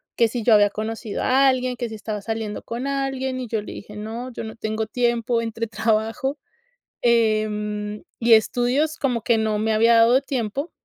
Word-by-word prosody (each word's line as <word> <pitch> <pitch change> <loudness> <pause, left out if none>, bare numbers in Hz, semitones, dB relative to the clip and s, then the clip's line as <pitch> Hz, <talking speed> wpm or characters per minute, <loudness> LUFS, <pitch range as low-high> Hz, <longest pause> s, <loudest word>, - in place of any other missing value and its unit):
que 230 -2 +3
si 235 -1 -3
yo 225 - +5
había 205 -1 +6
conocido 220 +1 -4
a 270 +1 +4
alguien, 255 -1 0
que 240 -2 -4
si 220 - -7
estaba 210 -1 -5
saliendo 220 -1 -4
con 240 +4 -4
alguien, 265 -1 -2
y 250 - -4
yo 220 -1 -2
le - - -8
dije: 210 +1 -10
"No, 230 +4 -6
yo 230 - -6
no 220 - -8
tengo 220 0 -2
tiempo" 235 -1 0
entre 230 0 -3
trabajo, 225 +6 -1 0.6
em, 210 -2 0 0.2
y 230 -1 +5
estudios, 250 +8 +2
como 245 -5 0
que 235 -2 +3
no 215 -1 0
me 220 +1 0
había 230 +2 +5
dado 235 +4 +5
tiempo. 270 +2 -3
230 Hz, 190 wpm, -23 LUFS, 215-250 Hz, 0.6 s, había